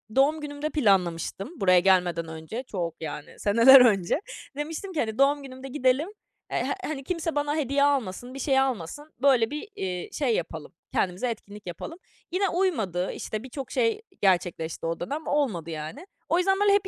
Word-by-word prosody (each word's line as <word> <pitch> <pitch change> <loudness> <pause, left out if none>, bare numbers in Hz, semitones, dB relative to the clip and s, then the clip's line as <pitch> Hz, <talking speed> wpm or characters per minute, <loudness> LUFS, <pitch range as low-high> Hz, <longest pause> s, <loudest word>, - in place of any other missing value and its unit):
doğum 295 +4 +3
günümde 295 0 -4
planlamıştım 195 - +1
buraya 185 -2 +6
gelmeden 180 -3 +2
önce, 160 +10 -6
çok 170 -4 -3
yani, 150 -1 -7
seneler 235 +6 +8
önce. 205 - +3 0.4
Demiştim 320 +6 -5
ki: 320 - -2
"Hani, 220 -3 -1
doğum 285 +1 +4
günümde 260 0 -9
gidelim, 260 +4 +1 0.4
eee, - - 0
eee, - - -1
hani, 285 -3 -4
kimse 330 0 -2
bana 290 0 0
hediye 280 -2 +1
almasın, 250 -4 0
bir 270 - -7
şey 270 -1 +2
almasın, 265 - -2
böyle 255 -4 +4
bir, 300 +8 -5
eee, 180 -2 -4
şey 255 -6 +1
yapalım, 160 -2 -5 0.2
kendimize 190 +7 0
etkinlik 205 -3 -8
yapalım." 325 - -6 0.3
Yine 385 +3 +1
uymadı, 220 - 0
işte, 215 +1 -5
birçok 265 +1 -7
şey, 460 -2 +3
eee, 435 0 -8 0.2
gerçekleşti 175 -4 +1
o 165 0 -2
dönem, 290 - -4
olmadı 215 - 0
yani. 160 - -6 0.2
O 335 - +3
yüzden, 385 +2 +2
böyle, 410 -1 +5
hep 400 -1 +2
255 Hz, 175 wpm, -26 LUFS, 185-295 Hz, 0.4 s, seneler